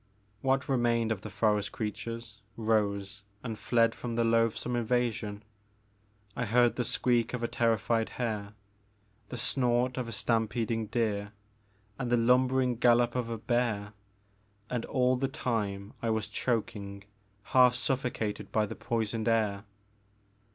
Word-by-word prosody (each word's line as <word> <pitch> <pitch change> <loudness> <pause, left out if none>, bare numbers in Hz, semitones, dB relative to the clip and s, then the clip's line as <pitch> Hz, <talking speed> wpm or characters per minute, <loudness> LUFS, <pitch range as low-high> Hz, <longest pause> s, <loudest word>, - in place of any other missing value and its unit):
What 135 +1 +1
remained 120 -3 +2
of 105 -3 -2
the 110 - -7
forest 105 0 +1
creatures 115 0 -5 0.2
rose 105 -2 0 0.2
and 115 -3 -3
fled 115 +1 +2
from 120 -2 -5
the 120 - +2
loathsome 115 +1 +1
invasion; 115 -3 -1 0.9
I 120 - -1
heard 120 +2 +4
the 125 - 0
squeak 120 -1 +1
of 120 - -5
a - - +2
terrified 115 -1 +1
hare, 105 -4 -3 0.7
the 125 - -5
snort 125 +1 +1
of 120 -2 -3
stampeding 115 -1 0
deer, 105 -3 -1 0.7
and 125 -2 -2
the 120 - +5
lumbering 125 +1 +3
gallop 120 0 +4
of 125 -2 -2
a 115 - -3
bear; 110 -3 -1 0.8
and 120 -2 -1
all 130 -1 +2
the 135 +1 0
time 105 -6 -2
I 115 - 0
was 110 -1 0
choking, 100 -4 -2 0.5
half 125 -1 +7
sufibcated 125 -5 -2
by 110 -1 +2
the - - -7
poisoned 115 -1 -2
air. 110 -3 +1
115 Hz, 135 wpm, -30 LUFS, 110-125 Hz, 0.9 s, half